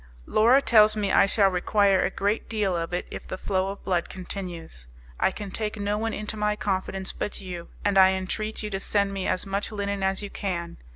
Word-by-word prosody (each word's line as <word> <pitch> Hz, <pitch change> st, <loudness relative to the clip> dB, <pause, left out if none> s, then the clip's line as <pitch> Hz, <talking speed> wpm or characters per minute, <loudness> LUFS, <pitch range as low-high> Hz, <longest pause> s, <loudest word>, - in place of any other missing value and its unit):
Laura 245 Hz, +6 st, +4 dB
tells 215 Hz, -2 st, +6 dB
me 205 Hz, -2 st, 0 dB
I -, -, +5 dB
shall 200 Hz, -1 st, +3 dB
require 195 Hz, +1 st, +3 dB
a -, -, +1 dB
great 205 Hz, +3 st, -1 dB
deal 210 Hz, -5 st, 0 dB
of 165 Hz, 0 st, -3 dB
it 180 Hz, 0 st, -2 dB
if -, -, -7 dB
the 185 Hz, -, -5 dB
flow 190 Hz, 0 st, -1 dB
of 200 Hz, -, -7 dB
blood 180 Hz, -3 st, 0 dB
continues. 175 Hz, -, -7 dB, 0.3 s
I -, -, +4 dB
can 200 Hz, 0 st, -7 dB
take 215 Hz, +1 st, -3 dB
no 205 Hz, 0 st, 0 dB
one 225 Hz, 0 st, -1 dB
into 215 Hz, 0 st, -4 dB
my 210 Hz, 0 st, 0 dB
confidence 190 Hz, -1 st, -2 dB
but 210 Hz, -, -4 dB
you, 180 Hz, -3 st, -7 dB, 0.2 s
and 200 Hz, -1 st, +4 dB
I 190 Hz, 0 st, +7 dB
entreat 215 Hz, +4 st, -3 dB
you 210 Hz, -, -4 dB
to 195 Hz, -, -2 dB
send 200 Hz, 0 st, 0 dB
me 195 Hz, -1 st, -2 dB
as 185 Hz, -, -1 dB
much 200 Hz, +3 st, -2 dB
linen 200 Hz, -1 st, -2 dB
as 190 Hz, +1 st, 0 dB
you 205 Hz, -, -6 dB
can. 170 Hz, -4 st, -4 dB
195 Hz, 220 wpm, -26 LUFS, 185-210 Hz, 0.3 s, I